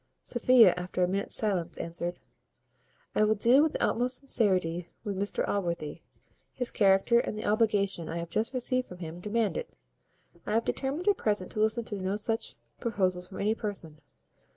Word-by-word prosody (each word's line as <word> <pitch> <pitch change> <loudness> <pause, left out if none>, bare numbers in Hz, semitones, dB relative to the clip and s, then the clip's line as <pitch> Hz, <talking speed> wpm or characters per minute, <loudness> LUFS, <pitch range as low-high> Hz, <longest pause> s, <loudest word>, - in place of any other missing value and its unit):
Sophia, 240 -5 +5
after 180 0 -2
a - - +3
minute's 195 +2 +3
silence, 180 -6 +1
answered, 175 +1 -4 1.0
"I - - +3
will 215 +1 +3
deal 240 +7 +5
with 315 0 +2
the - - -2
utmost 250 +2 0
sincerity 185 -10 0
with 205 -3 -3
Mr 200 +2 -1
Allworthy. 170 -5 -2 0.5
His 250 -2 -2
character, 195 +4 +4
and 215 - -3
the 215 - -5
obligation 205 -6 +1
I 165 - -3
have 170 0 -5
just 220 +6 0
received 255 0 -1
from 180 - -10
him, 170 -1 -7
demand 210 -1 -1
it. - - -5 0.7
I 210 - -3
have 230 +1 +1
determined 285 +7 -2
at 405 -2 +4
present 205 -4 -1
to - - -3
listen 220 +2 +2
to 210 - -4
no 190 +2 -1
such 225 +2 -2 0.2
proposals 185 -5 -1
from 190 - -7
any 210 +2 +2
person. 195 -9 -5
205 Hz, 175 wpm, -29 LUFS, 180-230 Hz, 1.0 s, Sophia